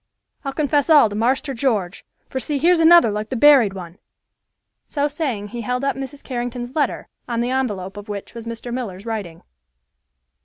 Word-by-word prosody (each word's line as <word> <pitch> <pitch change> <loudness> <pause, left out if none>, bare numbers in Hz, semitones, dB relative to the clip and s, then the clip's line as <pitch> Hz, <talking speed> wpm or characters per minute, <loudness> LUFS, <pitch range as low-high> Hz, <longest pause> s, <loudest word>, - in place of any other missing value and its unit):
I'll 275 - -3
confess 290 0 +1
all 295 -8 +7
to 205 - -6
Marster 260 +6 0
George, 220 -8 -1 0.2
for 260 - -4
see, 285 +4 -2
here's 340 +4 +4
another 330 -7 +7
like 210 +1 -4
the 260 - -3
buried 255 -6 +6
one." 180 -2 -9 0.9
So 290 -1 0
saying, 270 -9 -3
he 240 +2 -6
held 250 +3 -2
up 275 - 0
Mrs. 270 +1 -7
Carrington's 245 0 -5
letter, 290 -4 -1 0.2
on 235 -1 -1
the 240 +2 0
envelope 205 -8 -2
of 205 +1 -9
which 200 -1 -6
was 230 -1 -8
Mr. 230 +1 -6
Miller's 210 -6 -5
writing. 200 -8 -5
245 Hz, 180 wpm, -21 LUFS, 210-280 Hz, 0.9 s, all